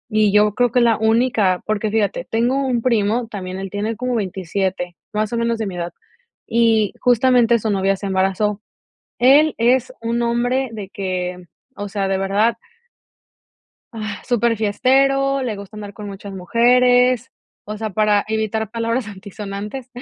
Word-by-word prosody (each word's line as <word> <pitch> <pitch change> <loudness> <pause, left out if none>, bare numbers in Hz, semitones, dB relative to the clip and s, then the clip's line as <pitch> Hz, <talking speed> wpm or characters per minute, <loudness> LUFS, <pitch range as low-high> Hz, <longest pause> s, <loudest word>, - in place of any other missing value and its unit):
y 215 -1 +4
yo 210 0 +4
creo 245 +1 +1
que 250 - +3
la 230 -2 +3
única, 220 -4 +2
porque 215 0 -1
fíjate, 210 -3 -1
tengo 240 +4 +1
un 245 -2 0
primo 230 -1 +1
también, 185 -3 -6
él 195 -1 -6
tiene 210 +2 -2
como 250 +2 -2
27, 190 -3 -2 0.2
más 215 +1 -1
o - - 0
menos 230 0 0
de 220 - -3
mi 190 - -6
edad, 175 0 -4 0.6
y 225 -2 +2
justamente 245 -1 +4
su 220 0 -1
novia 195 0 +1
se 200 - -7
embarazó. 195 +2 0 0.6
Él 285 +5 +5
es 250 +2 +2
un 235 +1 -1
hombre 245 +2 0
de 210 -4 -7
que, 180 -2 -4 0.3
o 205 0 -5
sea, 200 -1 -2
de 195 - +1
verdad. 200 +4 +1 1.4
Agh, 215 -3 -6
súper 235 -1 +1
fiestero, 275 +5 +2
le 230 -5 -3
gusta 200 +1 -10
andar 205 -1 -7
con 210 +1 -9
muchas 200 0 -8
mujeres, 245 +5 +3 0.3
o 210 +1 -6
sea, 220 0 -3
para 210 0 +2
evitar 220 0 -2
palabras 230 +1 -2
antisonantes, 205 +4 -7
220 Hz, 160 wpm, -20 LUFS, 200-240 Hz, 1.4 s, Él